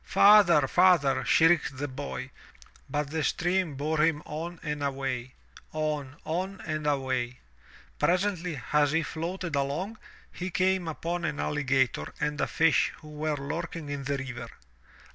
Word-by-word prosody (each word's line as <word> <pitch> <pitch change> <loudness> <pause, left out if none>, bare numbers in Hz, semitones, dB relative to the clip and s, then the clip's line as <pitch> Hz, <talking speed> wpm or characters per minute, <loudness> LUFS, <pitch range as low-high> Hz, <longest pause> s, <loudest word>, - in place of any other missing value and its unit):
*' - - -32
"Father, 195 -8 +7
Father," 175 -5 +4
shrieked 165 -4 +4
the 145 +2 -2
boy, 140 +1 -6 0.6
but 145 +1 -2
the 160 -1 -1
stream 175 -3 0
bore 150 +3 -1
him 155 -1 +2
on 165 +3 -5
and 150 -1 -3
away, 135 -3 -3 0.4
on, 150 -3 -2
on 185 +4 -2
and 155 -1 -2
away. 130 -3 -1 0.6
Presently, 180 -4 +1
as 150 -1 +4
he 165 +1 +2
floated 170 0 -4
along, 155 +11 -2 0.3
he 180 +1 -5
came 185 -1 +1
upon 170 +2 -3
an 150 -2 -2
alligator 135 -3 0
and 150 -1 -1
a - - +1
fish 160 -3 +3
who 155 - -12
were 150 0 -2
lurking 160 +2 -5
in 140 -1 -4
the 140 0 0
river. 125 -3 -6
150 Hz, 145 wpm, -28 LUFS, 140-170 Hz, 0.6 s, Father